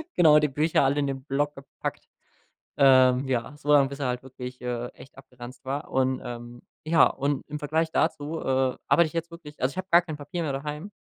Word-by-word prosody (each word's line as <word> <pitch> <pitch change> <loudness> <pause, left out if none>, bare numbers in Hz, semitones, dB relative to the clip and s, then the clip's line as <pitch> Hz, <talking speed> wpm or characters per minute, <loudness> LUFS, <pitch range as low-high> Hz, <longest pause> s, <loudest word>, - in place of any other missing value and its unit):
genau, 150 -3 +6
die 150 - +2
Bücher 150 +2 +1
alle 140 +2 +2
in 140 - 0
den 135 -1 -4
Block 145 +1 -1
gepackt, 135 0 -7 0.7
ähm, 130 -1 +5
ja, 130 +3 -2
so 150 0 -2
lang, 140 -2 +5
bis 140 +1 -8
er 135 - -1
halt 125 0 -3
wirklich, 125 -1 -9
äh, 120 -1 -3
echt 135 +2 -16
abgeranzt 125 -2 -12
war, 140 +2 -4
und, 130 0 0
ähm 120 0 -8 0.2
ja, 165 +1 +5
und 140 0 -2
im 150 0 -5
Vergleich 160 +2 -1
dazu, 150 +3 -1
äh, 130 -1 0
arbeite 170 -1 +4
ich 155 - -12
jetzt 170 0 -3
wirklich 150 -3 -12
also 130 +2 +1
ich - - -15
habe 185 0 -4
gar 170 +1 +7
kein 160 -3 -7
Papier 150 +4 -5
mehr 140 -3 -2
daheim 150 +6 -5
140 Hz, 220 wpm, -26 LUFS, 130-150 Hz, 0.7 s, gar